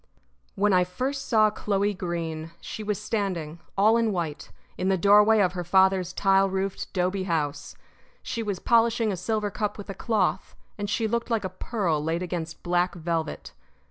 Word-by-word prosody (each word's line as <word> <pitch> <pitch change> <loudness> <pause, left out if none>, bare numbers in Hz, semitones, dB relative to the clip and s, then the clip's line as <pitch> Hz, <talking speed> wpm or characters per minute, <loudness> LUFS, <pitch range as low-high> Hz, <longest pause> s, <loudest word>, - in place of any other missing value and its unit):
When 205 0 +2
I 180 -1 +5
first 260 +10 -3
saw 215 -3 +4
Chloe 205 -1 0
Greene 165 -3 -4
she - - -7
was 210 -1 -2
standing, 185 -7 -3 0.2
all 215 +3 +5
in 230 -2 +1
white, 165 -6 -4 0.3
in 185 - -1
the 190 - +3
doorway 210 +3 +6
of 180 -2 +2
her 180 -1 -3
father's 190 0 +3
tile 195 0 +3
roofed 190 0 -3
'dobe 185 +1 -1
house. 145 -4 -2 0.5
She 230 - -3
was 205 -4 -2
polishing 230 0 +2
a - - -1
silver 205 +3 -2
cup 210 0 -2
with 205 -1 -7
a - - -5
cloth, 220 +3 -1 0.2
and 205 -1 -4
she 220 +2 0
looked 235 +2 -2
like 225 -3 0
a - - -2
pearl 185 -5 -2
laid 165 +3 -1
against 165 -2 -5
black 175 0 +1
velvet. 165 -1 -3
195 Hz, 175 wpm, -26 LUFS, 175-215 Hz, 0.5 s, doorway